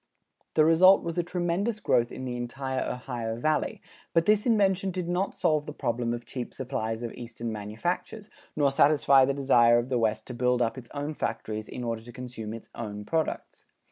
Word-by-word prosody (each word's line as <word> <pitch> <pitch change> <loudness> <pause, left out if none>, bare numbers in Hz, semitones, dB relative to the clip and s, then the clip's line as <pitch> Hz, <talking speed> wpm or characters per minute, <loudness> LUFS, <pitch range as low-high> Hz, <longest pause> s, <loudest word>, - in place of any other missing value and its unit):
The 155 - +5
result 185 +4 +6
was 170 +1 -2
a - - +4
tremendous 180 +5 -1
growth 120 - +2
in 130 - -6
the 125 -1 -3
entire 130 +2 -3
Ohio 120 -3 -4
Valley, 155 +5 -1 0.3
but 165 -1 +3
this 210 +2 +3
invention 195 -4 +3
did 180 -2 -3
not 180 +3 -1
solve 155 -1 +1
the 150 - -5
problem 120 -3 -1
of 120 0 -4
cheap 125 0 -6
supplies 115 -3 -3
of 115 - -4
Eastern 115 -1 -6
manufactures, 115 - -4 0.2
nor 145 -2 +3
satisfy 140 -1 +5
the 140 +1 0
desire 120 -4 +5
of 120 +2 -1
the 125 -2 +1
West 110 -1 0
to 125 - -7
build 125 +1 +1
up 115 0 +1
its 125 -3 -10
own 145 +2 -3
factories 110 -6 -4
in 125 - -6
order 115 -1 -2
to 120 +2 -12
consume 120 -4 -7
its 115 0 -9
own 105 -3 -6
products. 160 +3 -3
130 Hz, 195 wpm, -28 LUFS, 120-165 Hz, 0.3 s, result